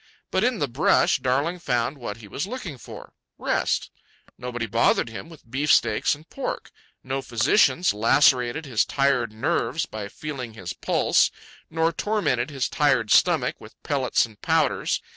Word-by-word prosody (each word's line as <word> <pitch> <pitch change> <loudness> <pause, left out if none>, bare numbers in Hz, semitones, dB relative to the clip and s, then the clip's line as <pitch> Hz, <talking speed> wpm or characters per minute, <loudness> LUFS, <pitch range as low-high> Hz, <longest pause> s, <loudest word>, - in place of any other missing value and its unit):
But - - +1
in 245 -1 +1
the 145 - -1
brush, 135 +3 +2
Darling 140 +8 0
found 125 -3 -1
what 110 -4 -6
he 110 -2 -12
was 140 - -4
looking 195 - -6
for—rest. - - -4 0.4
Nobody 120 -2 -4
bothered 115 +2 +2
him 115 +8 -8
with 160 -7 -16
beefsteaks 125 -3 +2
and 155 +3 -18
pork. 275 - -5 0.3
No 135 +1 -3
physicians 135 - +2
lacerated 125 +5 +3
his 120 -6 +1
tired 135 -5 +1
nerves 110 +1 -1
by 105 -2 -6
feeling 130 -2 -7
his 90 -5 -6
pulse, - - +2 0.4
nor 165 +1 0
tormented 205 - 0
his 135 -3 -2
tired 135 -7 +1
stomach - - +3
with - - -13
pellets 135 -4 +1
and 110 -2 -17
powders. 160 -4 +1
130 Hz, 145 wpm, -24 LUFS, 115-155 Hz, 0.4 s, lacerated